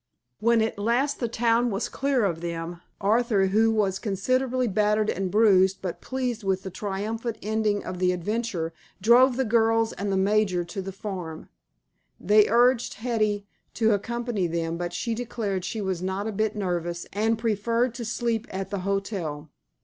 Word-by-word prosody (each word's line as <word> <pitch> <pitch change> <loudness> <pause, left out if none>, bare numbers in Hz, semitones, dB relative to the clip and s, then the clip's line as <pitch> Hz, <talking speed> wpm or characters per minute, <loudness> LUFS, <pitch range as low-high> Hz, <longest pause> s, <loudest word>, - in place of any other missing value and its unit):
When 235 0 +3
at 220 -2 -3
last 245 +7 +1
the 235 - 0
town 235 +1 +2
was 200 -2 -2
clear 275 -5 0
of 170 -4 -1
them, 170 0 -5 0.2
Arthur, 215 -1 +2
who 215 +4 +3
was 200 -3 +1
considerably 255 +5 0
battered 210 +1 +2
and 190 0 -2
bruised 195 -2 +4
but 180 -3 -5
pleased 250 -4 -3
with 190 -1 0
the 190 - -6
triumphant 215 +4 -3
ending 215 -1 0
of 180 - -5
the 180 0 +3
adventure, 180 -2 -2 0.3
drove 245 +5 +5
the 265 - +1
girls 225 0 +2
and 200 +1 -3
the 195 - +1
major 195 -2 +2
to 195 +3 -5
the 195 +1 -6
farm. 180 -5 -6 0.7
They 210 +2 +4
urged 240 +2 +3
Hetty 215 -3 -1 0.3
to 225 -1 +3
accompany 230 -1 -1
them, 165 0 -2
but 175 0 -3
she 180 +7 -2
declared 220 -5 -3
she 220 +3 -3
was 190 -3 -2
not 190 +2 -2
a 220 - -2
bit 215 +1 -1
nervous 175 -3 -2
and 220 +3 +1
preferred 230 +2 0
to 240 0 -6
sleep 230 0 -1
at 190 0 -5
the 200 - -2
hotel. 180 -6 -3
210 Hz, 170 wpm, -26 LUFS, 190-230 Hz, 0.7 s, drove